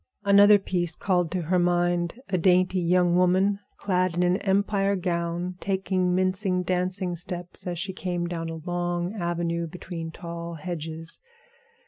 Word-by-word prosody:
Another 200 +1 +7
piece 175 -4 -1
called 180 -4 +1
to 180 0 -2
her 180 +3 +1
mind 175 +2 +1
a 190 - 0
dainty 185 +1 +3
young 175 0 +3
woman 185 +3 +3 0.2
clad 185 -3 0
in 175 - +2
an 180 +1 +3
Empire 200 0 +1
gown, 175 0 -2
taking 190 -2 0
mincing 185 0 +1
dancing 180 0 -1
steps 175 +1 -5
as 175 -1 -3
she 190 +3 -3
came 175 -2 -2
down 165 -1 -4
a 165 - -5
long 175 +2 -2
avenue 170 -3 -2
between 165 -1 -6
tall 170 0 -7
hedges. 165 -1 -5
180 Hz, 145 wpm, -26 LUFS, 170-185 Hz, 0.2 s, Another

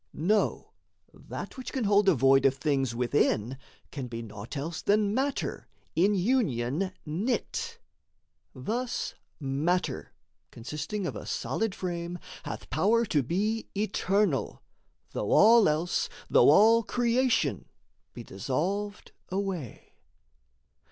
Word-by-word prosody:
Know, 205 +8 0 0.4
That - - -8
which 260 - -6
can 260 - -2
hold 205 -1 +4
a 185 - +4
void 135 +1 +5
of 135 - +1
things 135 -4 0
within 125 -1 +1 0.3
Can 135 -4 -5
be 115 -1 -6
naught 105 +5 -8
else 155 +4 -4
than 205 0 +2
matter 270 +4 -2 0.3
in 195 +5 +3
union 185 - 0
knit. 240 - -2 0.8
Thus 235 - -3 0.3
matter, 155 +6 -1 0.4
consisting 150 - -5
of - - -3
a - - -7
solid 220 -3 -2
frame, 175 -1 -4 0.3
Hath - - -7
power 215 - +3
to 150 -8 +1
be 210 - -1
eternal, 200 - 0 0.5
though 105 - -3
all 225 -3 +7
else, 160 +4 0 0.2
Though - - +6
all 225 +2 +6
creation, 235 - +1 0.5
be - - -7
dissolved 180 - -3 0.2
away. 185 - -4
180 Hz, 115 wpm, -28 LUFS, 135-215 Hz, 0.8 s, all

